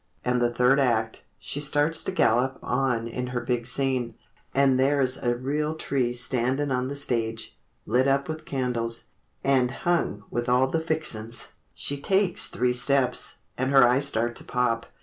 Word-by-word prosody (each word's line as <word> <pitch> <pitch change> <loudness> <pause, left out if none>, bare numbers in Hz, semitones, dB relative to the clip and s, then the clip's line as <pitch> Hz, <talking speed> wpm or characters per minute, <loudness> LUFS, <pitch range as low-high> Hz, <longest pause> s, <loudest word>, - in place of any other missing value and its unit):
And 125 0 +1
the 120 0 +2
third 125 +3 +3
act, 115 -4 0 0.2
She 145 - -5
starts 150 +2 +3
to - - -2
gallop 130 -6 +2
on 125 -3 0
in 125 +2 -4
her 125 0 -3
big 120 -1 -2
scene— 130 -4 0 0.4
And 135 -1 +3
there's 135 -1 +3
a 120 -1 -1
real 150 +5 -2
tree 130 -5 -1
standin' 130 +3 0
on 125 0 0
the 140 - -5
stage, 115 -5 -3 0.3
Lit 125 +5 +2
up 140 0 +1
with 155 0 -5
candles, 120 -3 -2 0.4
and 130 -2 +3
hung 160 - -1
with 120 +1 -2
all 125 +1 +3
the 160 +5 -1
fixin's! 120 -9 -3 0.3
She 145 0 -3
takes 190 +2 +3
three 125 0 0
steps—and 130 0 0
her 135 -3 +6
eyes 135 +3 +2
start 120 -2 0
to - - -9
pop. 115 -2 -1
130 Hz, 165 wpm, -25 LUFS, 120-140 Hz, 0.4 s, her